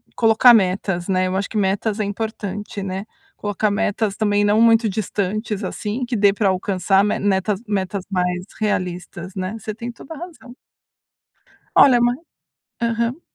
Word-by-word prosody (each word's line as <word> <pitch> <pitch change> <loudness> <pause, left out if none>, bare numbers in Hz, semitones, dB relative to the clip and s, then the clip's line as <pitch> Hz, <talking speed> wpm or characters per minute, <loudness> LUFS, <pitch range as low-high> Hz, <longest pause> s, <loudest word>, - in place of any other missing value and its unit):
colocar 225 +2 +6
metas, 185 -3 +1
né, 185 -1 +1
eu 185 - -2
acho 195 +1 -1
que 220 - -4
metas 205 +2 0
é - - +1
importante, 205 -1 -4
né. 190 +1 -4 0.3
Colocar 205 +1 -1
metas, 210 0 0
também, 205 -1 +1
não 210 +2 +3
muito 230 -1 +5
distantes, 210 +1 -2
assim, 220 +6 -3
que 240 - -3
dê 205 -2 +5
pra 205 0 0
alcançar 190 +1 +1
me 205 - 0
netas 200 +1 0
metas 190 -1 -2
mais 180 -1 -1
realistas, 180 -3 -3
né? 185 +3 -3
Você 215 0 -6
tem 235 +2 -6
toda 270 +6 -11
a 315 - -9
razão. 310 -8 -10 1.2
Olha, 250 -3 +7
mas 240 +1 +2 0.6
Aham. 235 +4 -1
205 Hz, 155 wpm, -21 LUFS, 190-225 Hz, 1.2 s, Olha